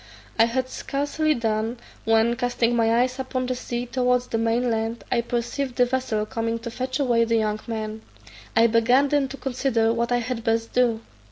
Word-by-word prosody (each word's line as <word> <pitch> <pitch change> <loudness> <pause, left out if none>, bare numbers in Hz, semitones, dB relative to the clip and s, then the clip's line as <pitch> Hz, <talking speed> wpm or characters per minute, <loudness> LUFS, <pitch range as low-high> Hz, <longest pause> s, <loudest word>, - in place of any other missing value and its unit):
I 225 - +7
had 255 +2 -1
scarcely 290 +4 -1
done, 225 +1 -1 0.3
when, 225 +1 +3
casting 245 -1 0
my 230 0 +3
eyes 255 +1 -3
upon 260 -1 -2
the 255 - -1
sea 245 -1 -4
towards 250 0 +1
the 225 -2 -2
main 230 +2 +1
land, 225 +1 -2
I 240 -2 +2
perceived 245 +2 -3
the 245 - +4
vessel 245 -4 -1
coming 230 0 -2
to 235 - -4
fetch 255 +3 -3
away 240 -4 +3
the 230 0 +1
young 215 -1 0
man. 220 -1 -4 0.5
I 225 - +6
began 240 +5 +4
then 285 -1 +2
to 275 - -8
consider 245 -4 0
what 235 +1 -1
I 245 - +3
had 240 -1 -3
best 225 0 0
do. 240 -3 +2
240 Hz, 190 wpm, -24 LUFS, 225-255 Hz, 0.5 s, I